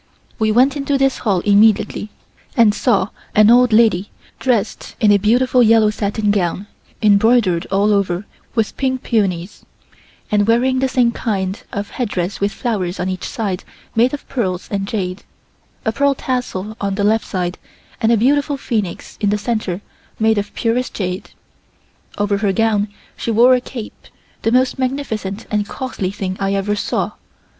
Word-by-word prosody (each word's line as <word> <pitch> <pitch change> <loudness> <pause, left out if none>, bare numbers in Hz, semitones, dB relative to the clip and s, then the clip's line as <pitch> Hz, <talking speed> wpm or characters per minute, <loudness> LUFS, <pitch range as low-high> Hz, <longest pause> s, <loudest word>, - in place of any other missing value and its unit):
We 220 -1 +2
went 255 +5 +4
into 280 -1 0
this 270 0 +1
hall 195 -6 +1
immediately 210 +1 +3 0.5
and 225 -3 +6
saw 205 -3 +1 0.3
an 215 +1 +6
old 245 0 +5
lady 215 -4 +3 0.3
dressed 245 -6 -1
in 215 -4 +4
a 200 - +5
beautiful 250 +5 +3
yellow 220 -2 +5
satin 210 0 -1
gown 190 -1 -1 0.4
embroidered 205 -3 +3
all 200 +2 +2
over 195 -1 0 0.3
with 225 -3 0
pink 260 -1 -1
peonies, 195 -5 -1 0.7
and 205 0 +2
wearing 255 +3 +3
the 265 - +2
same 250 -2 +2
kind 195 -4 -2
of 200 -1 -4
headdress 200 -6 -2
with 200 +1 +1
flowers 200 -7 -2
on 180 - -1
each 185 0 -4
side 205 -8 -3 0.3
made 240 +3 +4
of 290 - -6
pearls 185 -8 -2
and 195 -1 -2
jade, 185 -3 -3 0.6
a 220 - +2
pearl 280 +4 +2
tassel 220 -6 -3
on 200 -1 -1
the 200 - -1
left 220 +2 +2
side 180 -2 -3 0.4
and 225 - +3
a 230 - +4
beautiful 285 +5 +2
phoenix 215 -9 -3
in 205 - +2
the 210 - +1
center 210 -4 -2 0.4
made 220 -1 +2
of 205 - -5
purest 245 +2 -1
jade. 185 -1 -3 0.9
Over 205 -1 0
her 200 -1 +1
gown 215 0 +1 0.3
she - - -4
wore 235 +3 +6
a 250 - +2
cape, 240 -3 -9 0.3
the 225 - +1
most 255 +2 +2
magnificent 225 -6 -3
and 210 -1 0
costly 255 -8 -4
thing 190 -1 -4
I 195 0 0
ever 200 +1 0
saw. - - -1
215 Hz, 165 wpm, -18 LUFS, 200-240 Hz, 0.9 s, and